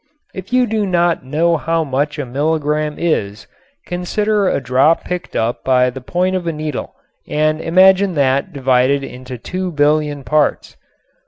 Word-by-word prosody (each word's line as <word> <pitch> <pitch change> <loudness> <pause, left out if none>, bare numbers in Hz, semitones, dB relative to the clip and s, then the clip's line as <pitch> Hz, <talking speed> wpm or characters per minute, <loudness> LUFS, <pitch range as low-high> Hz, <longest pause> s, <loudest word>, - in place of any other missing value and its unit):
If 190 +1 -9
you 250 0 +3
do 215 -2 -1
not 175 -4 +1
know 165 +5 +1
how 165 +2 -1
much 145 +2 -2
a 145 - -3
milligram 150 +3 -1
is 105 -11 -2 0.4
consider 205 +3 0
a - - 0
drop 130 +5 +2
picked 180 0 -5
up 115 +2 -1
by 125 -1 +3
the 130 +1 -8
point 180 +7 -1
of 180 -2 -3
a - - +1
needle 155 -3 -5 0.3
and 155 +1 0
imagine 190 +2 +4
that 140 +4 +1
divided 135 -1 +1
into 130 -1 -8
two 185 +8 -4
billion 150 -1 +1
parts. 150 +2 0
155 Hz, 155 wpm, -17 LUFS, 135-180 Hz, 0.4 s, imagine